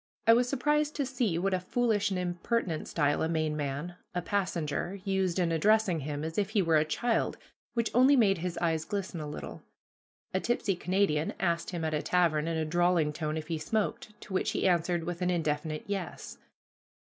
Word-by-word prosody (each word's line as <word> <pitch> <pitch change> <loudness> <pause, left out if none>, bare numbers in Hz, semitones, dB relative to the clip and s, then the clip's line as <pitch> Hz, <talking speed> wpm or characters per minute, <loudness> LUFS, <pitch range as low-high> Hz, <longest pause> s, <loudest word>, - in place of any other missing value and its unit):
I 230 - +8
was 245 +1 +3
surprised 295 +3 +1
to 285 - 0
see 245 -9 0
what 190 +3 0
a 185 - +2
foolish 210 +1 +1
and 190 - -1
impertinent 180 0 -1
style 145 0 +1
a 160 - +1
Maine 155 -2 0
man, 150 +4 -4 0.2
a 180 - 0
passenger, 175 -1 -2
used 190 -2 0
in 175 -2 +1
addressing 200 +1 +3
him, 145 +1 -4
as 160 +4 -2
if 200 -1 0
he 215 -2 +2
were 165 -2 +4
a 150 - +4
child, 230 +9 0 0.4
which 230 -1 0
only 260 +4 +6
made 200 -7 +4
his 175 0 -3
eyes 165 -2 0
glisten 185 0 -4
a 150 - -5
little. 150 - -7 0.7
A 185 - +2
tipsy 220 -3 0
Canadian 180 -4 0
asked 170 -2 0
him 170 -3 -3
at 155 - -1
a 150 - 0
tavern, 165 -4 +2
in 165 -1 -1
a 160 - 0
drawling 175 -1 +2
tone, 155 0 -2
if 155 - -4
he 165 -2 -2
smoked, 210 +4 -2
to 195 - -9
which 185 - 0
he - - +1
answered 175 -1 +1
with 175 +1 -4
an 180 - +1
indefinite 155 -2 -1
"Yes." 195 -3 -5
175 Hz, 200 wpm, -30 LUFS, 160-205 Hz, 0.7 s, I